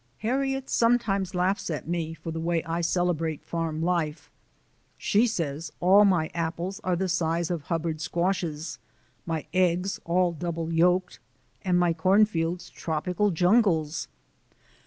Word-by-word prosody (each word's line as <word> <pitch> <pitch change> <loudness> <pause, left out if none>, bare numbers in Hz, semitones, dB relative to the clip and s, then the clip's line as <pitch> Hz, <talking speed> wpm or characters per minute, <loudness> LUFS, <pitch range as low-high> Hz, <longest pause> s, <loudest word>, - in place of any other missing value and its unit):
Harriet 270 +2 0
sometimes 210 -6 +1
laughs 185 +2 0
at 155 -2 -4
me 165 -1 -2
for 165 +1 -7
the 165 - -4
way 165 0 0
I 165 +1 -2
celebrate 165 -3 0
farm 165 -1 -2
life. 165 -3 -1 0.7
She 225 +4 +2
says 160 -6 -3
all 195 +4 +6
my 175 -5 +2
apples 170 +3 -3
are 180 -1 +1
the 190 +2 -1
size 170 -1 0
of 170 -3 -2
Hubbard 165 -2 -2
squashes, 170 -2 -2 0.5
my 160 -2 -2
eggs 185 +1 +1
all 180 +1 +2
double 165 0 -4
yolked, 180 +2 +2 0.4
and 180 -2 +1
my 175 -1 +3
cornfields 180 -1 +2
tropical 180 +5 -1
jungles. 175 -4 +2
175 Hz, 135 wpm, -27 LUFS, 165-185 Hz, 0.7 s, all